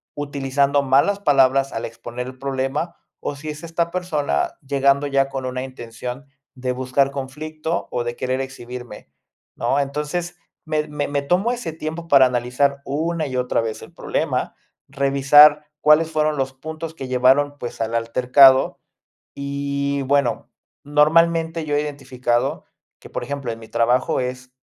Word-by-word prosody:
utilizando 140 0 0
malas 140 +9 +3
palabras 135 -5 +3
al 115 - -3
exponer 120 +2 -7
el 130 0 -10
problema, 135 +4 -2 0.2
o 145 - -4
si 150 +2 -7
es 150 +2 -7
esta 170 0 -2
persona 155 - -1
llegando 140 +1 +2
ya 135 -1 +1
con 135 -1 -4
una 130 0 -3
intención 125 +1 -7 0.3
de 125 0 -2
buscar 130 +2 +1
conflicto, 155 +4 -4
o 120 - -1
de 120 0 -4
querer 130 +2 -2
exhibirme, 125 - -8 0.5
¿no? 140 - 0
Entonces, 150 +5 -3 0.3
me 155 -1 -1
me 150 -1 -3
me 145 0 -1
tomo 180 +10 +1
ese 240 -10 -4
tiempo 160 +1 -6
para 140 -4 +7
analizar 125 +3 0
una 160 +2 -1
y 130 -2 -4
otra 125 -2 +1
vez 110 -1 -4
el - - -13
problema, - - -2 0.3
revisar 140 +2 +5 0.2
cuáles 150 +2 +5
fueron 155 -1 +1
los 135 -1 -2
puntos 160 +4 -7
que 135 -5 -7
llevaron, 135 +3 +3
pues, 120 -4 -7
al 115 +1 -1
altercado. 125 +3 +5 0.6
Y, 140 0 -2
bueno, 135 -3 0 0.4
normalmente 165 +2 +3
yo 150 -1 -2
he - - +2
identificado 130 -4 -2 0.4
que, - - -13
por - - -4
ejemplo, 140 -1 -4
en 115 - -8
mi 110 -1 -13
trabajo 120 +3 +1
es 125 0 -5
140 Hz, 155 wpm, -21 LUFS, 130-150 Hz, 0.6 s, para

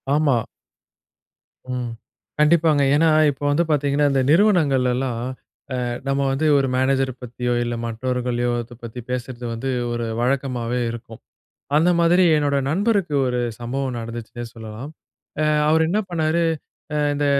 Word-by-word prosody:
ஆமா. 145 -6 +2 1.3
ம். 125 -2 -3 0.5
கண்டிப்பாங்க. 150 -1 +4
ஏன்னா, 160 +2 +4 0.2
இப்போ 140 +1 -10
வந்து 150 +4 +3
பாத்தீங்கன்னா, 145 0 +2
இந்த 135 -1 +2
நிறுவனங்களெல்லாம், 135 - +3 0.6
அ - - -1 0.2
நம்ம 135 0 +1
வந்து, 145 +4 0
ஒரு 135 -1 +1
மேனேஜர் 130 0 +1
பத்தியோ 125 0 -3
இல்ல 120 0 -2
மற்றவர்களையோ! 120 +1 -1
அத 120 +1 -13
பத்தி 115 +1 -7
பேசறது 125 -1 -4
வந்து, 130 +4 -3 0.2
ஒரு 120 0 -2
வழக்கமாவே 125 -2 -1
இருக்கும். 115 -1 -9 0.6
அந்த 165 +4 +4
மாதிரி 175 +2 +4
என்னோட 145 -1 +1
நண்பருக்கு 195 -2 +1
ஒரு 125 0 -1 0.2
சம்பவம் 130 +1 -3
நடந்துச்சுன்னே 115 +1 -6
சொல்லலாம். 110 +4 -8 0.5
அ - - +2 0.2
அவரு 160 +1 +4
என்னா 205 +5 +1
பண்ணாரு, 165 0 +1 0.5
அ - - 0 0.2
இந்த 145 0 0
135 Hz, 130 wpm, -22 LUFS, 120-150 Hz, 1.3 s, கண்டிப்பாங்க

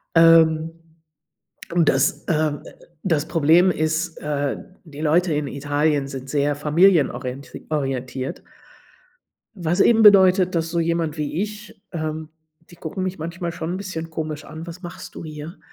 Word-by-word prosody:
ähm, 165 -1 +5 1.0
und 170 -3 +3
das, 140 +8 +1
ähm, 155 -3 0
äh - - -12 0.4
das 155 -1 0
Problem 165 +3 +4
ist, 160 +2 -1
äh, 145 -2 -2 0.3
die 150 -4 -11
Leute 165 +2 +2
in 150 -1 -1
Italien 145 +1 0
sind 135 0 -7
sehr 145 0 0
familienorienti 145 -5 +1
orientiert 135 -2 -3 1.1
was 175 0 0
eben 225 -1 +5
bedeutet, 190 -3 +6
dass 165 0 0
so 170 - 0
jemand 165 -2 -1
wie 150 +4 -2
ich, 210 -1 -7
ähm 155 -1 -4 0.4
die 175 - -14
gucken 185 +3 -5
mich 185 0 -3
manchmal 170 +2 -4
schon 165 0 -5
'n - - -3
bisschen 165 -4 -6
komisch 155 -1 -5
an: 160 +2 -9
„Was 170 +2 -9
machst 175 -2 -9
du - - -8
hier?“ 155 +3 -8
160 Hz, 150 wpm, -22 LUFS, 150-175 Hz, 1.1 s, bedeutet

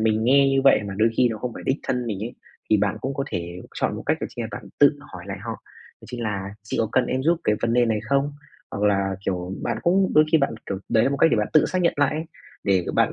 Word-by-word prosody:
mình 110 0 +1
nghe 135 +3 +5
như 135 0 +2
vậy 135 - +6
mà 100 - -5
đôi 110 +1 +4
khi 125 - +4
nó 110 -2 -4
không 125 +2 -4
phải - - -8
đích 130 - +2
thân 125 -1 -2
mình 105 -4 -3
ấy, 120 +3 -5 0.4
thì 110 - +6
bạn 100 -1 0
cũng 135 +1 -3
có 140 - -2
thể 85 +1 -5
chọn - - -1
một - - -6
cách - - +1
chính - - -6
là - - -5
bạn - - -7
tự 145 0 +5
hỏi 90 -1 -9
lại 100 0 -5
họ, 115 +2 -5 0.5
đó - - -15
chính 120 -1 -6
là 100 -3 -3
"Chị 105 - -4
có 110 - 0
cần 130 - +3
em 130 +1 -1
giúp 165 +3 +2
cái 105 - +3
vấn 115 - +1
đề 125 - +4
cái 120 - +3
này 110 -2 0
không?" 140 +6 0 0.4
Hoặc 100 - -4
là, 100 -2 +1
kiểu, 90 -1 -2
bạn - - -2
cũng 190 +2 +2
đôi 155 - +7
khi 160 - +6
bạn, 140 - 0
kiểu, 95 - -3
đấy 110 0 +3
là 135 - +2
một 140 - -1
cách 165 - +4
để - - +3
bạn 105 -1 0
tự 155 - +5
xác 185 -1 -1
nhận 170 - +2
lại, 145 +2 +1 0.4
để 95 -3 +2
bạn - - +3
115 Hz, 295 wpm, -23 LUFS, 100-140 Hz, 0.5 s, đôi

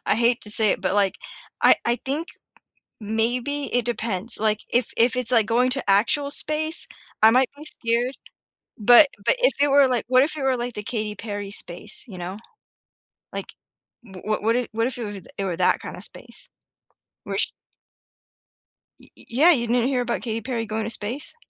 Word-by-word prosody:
I - - +3
hate 235 +1 +2
to 210 - -6
say 215 0 +2
it, - - -1
but, 190 0 -1
like, 200 -1 +1 0.4
I - - +7
I 235 +1 +1
think 295 +6 -2 0.7
maybe 240 +6 -1
it 245 -2 +1
depends, 225 -2 -3
like, 215 -1 +1
if 245 +1 0
if 235 +2 +4
it's, 250 -1 -2
like, 230 -4 +4
going 240 +3 +2
to 270 -6 -3
actual 260 +8 +2
space, 310 +3 -2 0.3
I 220 - +8
might 255 +1 +3
be 295 +2 -12
scared, 240 -1 -1 0.6
but 245 +7 +7 0.2
but - - +4
if - - +3
it 290 - +4
were, 275 -1 +6
like 250 -2 0
what 255 +1 +5
if 305 +2 -1
it 290 - -4
were, 265 -1 +2
like, 240 0 -4
the 210 - -5
Katy 215 -1 -3
Perry 205 -1 -6
space, 175 -3 -7
you 190 -4 -9
know, 180 +3 -6 1.0
like, - - -6 0.5
wha 190 -5 -12
wha 215 0 0
what 225 +2 +2
if 245 -1 0
what 225 +2 0
if 255 - -5
it 240 - -4
were 205 -2 -7 0.2
it 200 - -2
were 180 -3 -3
that 180 - +3
kind - - -8
of - - -8
space? - - -12 0.8
Where - - -4
sh - - +2 1.5
Y - - -20
y - - -17
yeah, 285 +9 +5
you 240 -7 +1
didn't 240 +2 +2
hear 265 -2 0
about 240 -1 -2
Katy 225 0 -3
Perry 230 0 -3
going 215 0 -3
to - - -3
space? 230 +5 -4
235 Hz, 200 wpm, -23 LUFS, 215-255 Hz, 1.5 s, I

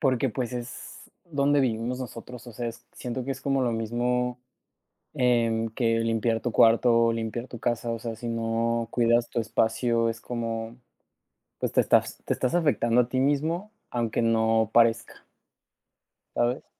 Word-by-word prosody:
porque, 130 -3 +2
pues, 125 +1 -3
es 120 0 -8
donde 145 -3 +2
vivimos 120 0 -1
nosotros, 125 0 -8
o 120 - -9
sea 120 +2 -4
es, 115 +1 -10
siento 125 0 -5
que 135 - -2
es 135 - -9
como 135 -1 0
lo 120 -2 +1
mismo 120 +2 -1 0.8
en 115 -4 +2
que 115 0 +1
limpiar 115 0 0
tu 120 - -2
cuarto, 115 0 +4
limpiar 115 +2 -4
tu 120 - -9
casa, 120 0 -1
o 115 - -3
sea, 115 -1 -5
si 120 - -6
no 115 0 -1
cuidas 120 0 +2
tu - - -2
espacio 115 +1 +1
es 115 0 -5
como, 115 -1 -4 0.8
pues, - - -1
te - - +5
estás - - +2
te - - +1
estás 130 +7 -1
afectando 125 -7 +3
a 120 - -3
ti 130 - 0
mismo 160 +9 0 0.2
aunque 120 -2 0
no 110 -1 +2
parezca. 115 -1 +2 1.1
¿Sabes? 120 +2 0
120 Hz, 160 wpm, -26 LUFS, 115-125 Hz, 1.1 s, te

